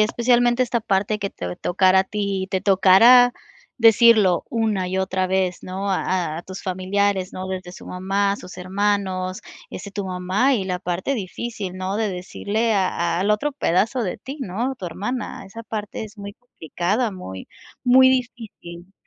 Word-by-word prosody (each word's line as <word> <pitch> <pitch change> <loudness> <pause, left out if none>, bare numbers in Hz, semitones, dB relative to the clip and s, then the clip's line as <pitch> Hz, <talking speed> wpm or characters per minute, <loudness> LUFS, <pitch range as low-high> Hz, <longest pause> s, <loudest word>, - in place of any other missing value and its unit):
especialmente 240 +2 +3
esta 235 -1 -1
parte 205 +1 0
que 200 -1 -3
te 90 0 -6
tocara 185 +1 +3
a 190 - -1
ti, 200 -2 -2
te 190 -1 0
tocara 210 +6 +6 0.5
decirlo 220 -5 +5
una 220 -5 0
y 190 +1 -2
otra 190 0 0
vez, 185 -1 0
¿no? 195 +2 -4
A 180 -4 -1
a - - -7
tus 190 0 -9
familiares, 190 +1 -1
¿no? 185 0 -6
Desde 185 -1 -5
su - - -12
mamá, 195 +2 0
a - - -3
sus 185 - -11
hermanos, 190 -1 -1 0.3
este, 200 - -8
tu 200 0 -4
mamá 185 +8 +1
y 195 -5 -1
la 180 -1 -2
parte 180 +9 -2
difícil, 205 -2 -5
¿no? 190 +2 -3
De 220 -1 0
decirle 210 +5 -2
a 175 -3 0
al 200 +3 +1
otro 280 +8 +1
pedazo 230 +1 0
de 185 - -3
ti, 270 +3 -8
¿no?, 240 +6 -2
tu 185 - -6
hermana. 210 +5 -5
Esa 230 +4 -9
parte 215 -1 -5
es 215 0 -13
muy 200 0 -8
complicada, 210 - -2
muy, 95 - -9 0.3
muy 260 +1 +6
difícil 220 -8 -4
195 Hz, 170 wpm, -22 LUFS, 185-225 Hz, 0.5 s, tocara